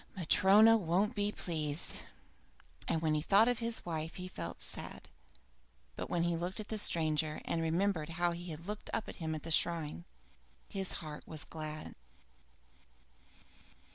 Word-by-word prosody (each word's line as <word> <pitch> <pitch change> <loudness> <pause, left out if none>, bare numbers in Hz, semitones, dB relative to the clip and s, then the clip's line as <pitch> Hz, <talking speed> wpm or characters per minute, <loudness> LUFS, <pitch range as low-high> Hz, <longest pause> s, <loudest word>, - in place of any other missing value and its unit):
Matryona 205 +6 +6
won't 195 +4 +1
be 205 -2 0
pleased!" 155 -5 -1 0.8
And 160 - 0
when 155 -1 +2
he 150 - +1
thought 200 +7 +5
of 245 -2 +1
his 230 -1 +1
wife 160 -1 -3
he 185 -1 -5
felt 85 - -6
sad; - - -3 0.9
but - - -5
when 170 -1 +1
he 170 0 +1
looked 175 +5 -4
at 210 - -7
the 220 - 0
stranger 155 -4 +1
and 165 - 0
remembered 165 0 0
how 175 0 +2
he 175 +1 -6
had 160 +1 -7
looked 210 +2 -5
up 220 - -1
at - - -8
him 160 -2 -2
at 155 - -6
the 165 - -5
shrine, 165 0 +1 0.6
his 195 -2 -2
heart 155 -2 -6
was 155 -2 -1
glad. 155 -1 -6
170 Hz, 160 wpm, -34 LUFS, 155-195 Hz, 0.9 s, Matryona